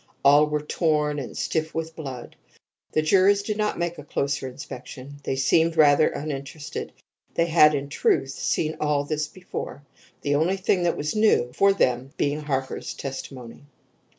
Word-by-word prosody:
All 145 +2 +7
were 150 0 -2
torn, 150 -2 0
and 130 - -7
stiff 160 -1 -2
with 160 0 -4
blood. 135 -6 -7 0.6
The 155 - +2
jurors 195 +4 +4
did 210 0 -3
not 210 -1 0
make 170 -1 -2
a - - -8
closer 140 -1 -2
inspection. 130 +1 -9
They 135 - -1
seemed 160 +5 +2
rather 150 0 +6
uninterested. 145 0 -6 0.4
They 170 - +3
had, 155 -2 +5
in 140 0 -3
truth, 135 -1 +1
seen 155 +3 -1
all 150 -1 +1
this 150 +1 -2
before; 180 -4 -7 0.4
the 145 - 0
only 165 +7 +2
thing 190 -1 +1
that 175 -1 +1
was 150 +5 -2
new 215 - +3
to 200 0 +5
them 130 -4 0
being 145 +1 0
Harker's 135 -3 -3
testimony. 130 -3 -7
150 Hz, 160 wpm, -25 LUFS, 140-165 Hz, 0.6 s, All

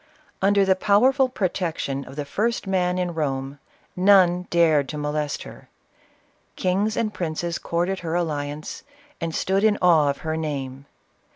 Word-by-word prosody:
Under 200 0 +4
the 190 0 +3
powerful 255 +8 +3
protection 170 - -2
of - - -11
the 145 -1 -4
first 220 +11 -1
man 180 -2 0
in 180 -1 -1
Borne, 140 -3 -3 0.4
none 180 -2 +4
dared 160 -5 +3
to 150 - -5
molest 150 0 -2
her, - - -13 0.4
— - - -39
kings 200 +4 0
and 215 -2 -1
princes 170 0 -3
courted 175 +3 -1
her 165 -1 -3
alliance, 150 -3 -3 0.4
and 165 -1 -3
stood 195 +2 0
in 215 -1 +4
awe 165 -5 +4
of 140 - -2
her 160 0 -1
name. 140 -3 -4
170 Hz, 155 wpm, -23 LUFS, 150-190 Hz, 0.4 s, Under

